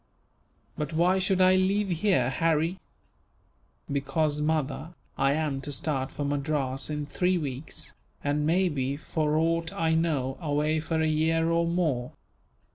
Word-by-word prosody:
"But 150 +1 -3
why 180 +4 +3
should 190 0 +1
I 185 0 +6
leave 195 +2 +2
here, 170 -8 +2
Harry?" 165 +4 +1 1.1
"Because, 145 +2 0
mother, 155 +2 -1 0.2
I 135 +1 +2
am 150 -3 -1
to 145 - -6
start 135 -2 -1
for 145 - -4
Madras 140 -2 -1
in 150 -1 -2
three 180 +5 +1
weeks; 140 -2 -5 0.3
and 145 +1 0
may 180 +5 +3
be, 140 -3 -2
for 155 0 -1
aught 165 +1 +1
I 160 -1 0
know, 150 -5 0
away 150 0 +1
for 160 +1 -2
a - - +2
year 165 +1 +2
or 170 0 +2
more. 155 -8 0
155 Hz, 145 wpm, -27 LUFS, 145-165 Hz, 1.1 s, I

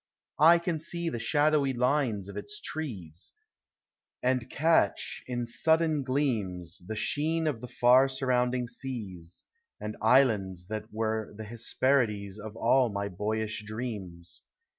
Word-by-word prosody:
I 165 +3 +8
can 170 -1 -2
see 170 +1 -1
the 120 - -4
shadowy 145 +3 +2
lines 125 -5 +1
of 100 - -9
its 205 - -5
trees, 100 - -6 0.9
And 125 -1 +1
catch, 160 +4 +1
in 120 -1 -2
sudden 160 +5 +2
gleams, 115 - -1
The 110 - -4
sheen 160 +8 0
of 140 -8 -1
the 125 - -6
far 125 +2 +5
surrounding 125 -2 0
seas, 100 -11 -6 0.3
And 105 0 -5
islands 105 -7 +3
that 110 0 -5
were 110 -1 -2
the 110 - -6
Ilesjierides 110 -2 0
Of 110 +1 -8
all 120 +2 +3
mv 100 -2 -4
boyish 110 +2 -2
dreams. 105 -6 -6
120 Hz, 130 wpm, -29 LUFS, 105-140 Hz, 0.9 s, I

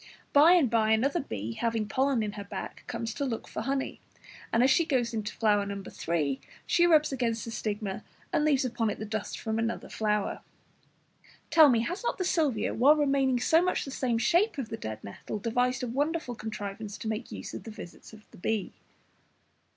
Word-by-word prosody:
By 305 +5 +8
and 340 -7 +5
by 220 -1 +2
another 275 +9 +2
bee, 110 - -4
having 225 - -1
pollen 260 +2 +1
on 210 - -2
her 205 -1 -7
back, 200 - -7
comes 230 -1 -3
to - - -3
look 240 -5 -3
for - - -5
honey, 270 +3 -2 0.5
and 230 - +4
as 265 - +5
she 335 - +4
goes 250 -7 0
into 215 -2 -3
No. 200 -2 +2
3, 145 -5 -1 0.2
she 345 0 +4
rubs 310 -3 +4
against 235 -4 -1
the 230 - -6
stigma 205 -3 -3 0.3
and 300 - +2
leaves 280 -3 +3
upon 230 -3 0
it - - -3
the 215 - -5
dust 215 -1 -4
from 220 0 -2
another 230 0 -2
flower. 210 -2 -1 1.1
Tell 315 -3 +8
me, 235 -3 +3
has 350 - -3
not - - -1
the 370 - -1
Salvia, 285 -12 +1
while 275 +6 +6
remaining 275 -4 +2
so 320 +6 +4
much 365 0 0
the 275 - -7
same 250 -3 0
shape 345 - +2
as 255 -5 -4
the - - -3
dead 110 - -6
nettle, 100 - -6
devised 245 +4 0
a - - -1
wonderful 290 +2 -1
contrivance 210 -2 -6
to - - -6
make 220 +2 -3
use - - -7
of - - -5
the - - -9
visits 210 -5 -11
of 215 -1 -15
the - - -15
bee? 215 +2 -2
230 Hz, 200 wpm, -29 LUFS, 215-275 Hz, 1.1 s, By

